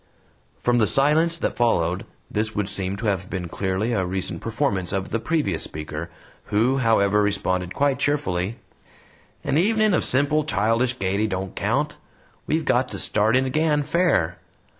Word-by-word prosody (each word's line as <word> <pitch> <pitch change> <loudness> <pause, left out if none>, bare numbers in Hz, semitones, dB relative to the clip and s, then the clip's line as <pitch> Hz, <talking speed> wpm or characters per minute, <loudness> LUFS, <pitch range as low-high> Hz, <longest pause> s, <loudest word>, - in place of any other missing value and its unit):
From 120 0 +2
the 110 - +3
silence 155 +7 +3
that - - -2
followed, 90 -7 +1 0.2
this 110 +1 -1
would 105 -1 -1
seem 95 -1 -2
to 110 - -5
have 95 -3 -1
been 90 -2 -4
clearly 95 +6 -1
a 95 - +1
recent 95 +1 -3
performance 95 -3 -1
of 95 -1 -2
the 115 - -1
previous 145 - 0
speaker, 75 +1 -5 0.4
who, 120 +6 +1
however, 105 -4 +3
responded 95 -3 -1
quite 140 -2 +1
cheerfully: 115 -9 -1 0.9
"An 140 +3 +1
evenin' 215 +2 +3
o' 175 - +3
simple, 145 +4 +2
childish 120 -2 +1
gaiety 100 +2 0
don't 95 -2 -4
count. - - -1 0.5
We've 160 +1 0
got 125 -1 +2
to - - -6
start 110 +4 +2
in 130 - +1
again 150 +2 +1
FAIR. 145 - +1
110 Hz, 160 wpm, -23 LUFS, 95-140 Hz, 0.9 s, the